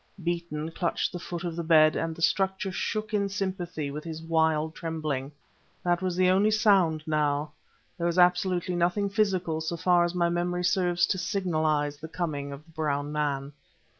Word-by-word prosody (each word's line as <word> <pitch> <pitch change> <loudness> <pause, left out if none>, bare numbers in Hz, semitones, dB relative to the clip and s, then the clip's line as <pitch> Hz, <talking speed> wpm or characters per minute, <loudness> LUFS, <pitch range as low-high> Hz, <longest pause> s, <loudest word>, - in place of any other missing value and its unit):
Beeton 170 -2 -3
clutched 170 +1 -1
the 175 - -4
foot 170 0 -6
of 170 -2 -3
the 170 - -3
bed, 155 -1 +5
and 165 -1 -2
the 165 - -5
structure 190 +1 +1
shook 215 +4 -3
in 200 -1 +1
sympathy 185 -7 -3
with 150 +2 -6
his 160 -1 -6
wild 160 -1 +1
trembling. 155 -5 -3 0.5
That 175 0 +1
was 185 -2 -1
the 185 0 +3
only 200 +3 +4
sound 195 -8 +3
now; 150 -1 0 0.5
there 170 - +1
was 170 +1 -1
absolutely 180 0 +3
nothing 180 +4 +1
physical 185 -6 0
so 165 +2 -3
far 175 0 +4
as 175 +1 -1
my 170 -1 +2
memory 175 +1 -1
serves 175 -1 +2
to 190 - -1
signalize 155 -6 0
the 160 - -8
coming 150 -5 -3
of 140 +2 -9
the 165 - -20
brown 145 -2 -2
man. 145 -2 -2
170 Hz, 180 wpm, -27 LUFS, 155-180 Hz, 0.5 s, bed